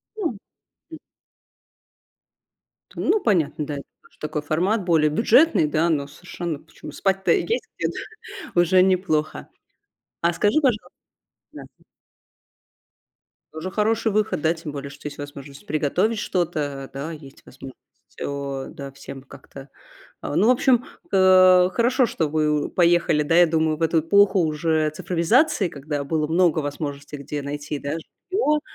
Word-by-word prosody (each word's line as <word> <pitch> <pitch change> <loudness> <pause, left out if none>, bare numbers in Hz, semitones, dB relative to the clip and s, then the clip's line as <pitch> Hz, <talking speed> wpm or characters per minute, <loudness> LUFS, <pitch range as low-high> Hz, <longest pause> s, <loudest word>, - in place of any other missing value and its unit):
Ну, 330 - -3 0.5
м. 320 - -9 2.0
Ну 435 - +1
понятно, 160 -8 0
да, 145 - -5
это 140 - -7 0.3
такой 155 0 -3
формат 180 +8 0
более 160 -3 +3
бюджетный, 235 - +4
да, 160 +3 +1
но 145 -3 0
совершенно 170 0 -6
почему - - -12
спать-то 195 0 0
есть 385 - +2 0.3
где- - - -1 0.7
уже 175 +1 +4
неплохо. 180 -5 0 0.7
А 170 0 +2
скажи, 205 - +2
пожалу 245 -6 0 0.6
да. - - -10 1.9
Тоже 160 +4 -5
хороший 220 +2 0
выход, 215 -6 0
да 160 +1 +2
тем 160 -2 -7
более, 140 -1 -6
что 145 +1 -9
есть 145 - -9
возможность 145 +5 -10
приготовить 180 +9 0
что-то, 150 -8 -2
да 140 +4 -5
есть 145 -4 -12
возможность 130 -1 -12 0.3
всё, 140 -1 -5
да 140 -1 -8
всем 135 0 -10
как-то 135 0 -13 0.5
а. - - -4
Ну, 215 +5 +4
в - - +7
общем, 250 0 +3 0.3
э, 185 -1 +6
хорошо, 250 +4 +2
что 165 -8 -1
вы 150 -1 0
поехали, 170 -3 +2
да 165 +3 +1
я 175 0 +7
думаю, 160 -1 0
в 165 - -5
эту 165 0 +2
эпоху 200 +3 +4
уже 155 -1 0
цифровизации, 185 - +2
когда 145 0 -4
было 155 +1 -1
много 165 0 +2
возможностей, 145 0 -5
где 145 +1 -5
найти, 145 +1 -5
да, 140 +1 -4 0.4
жильё. 300 -8 +2
160 Hz, 140 wpm, -23 LUFS, 145-190 Hz, 2.0 s, в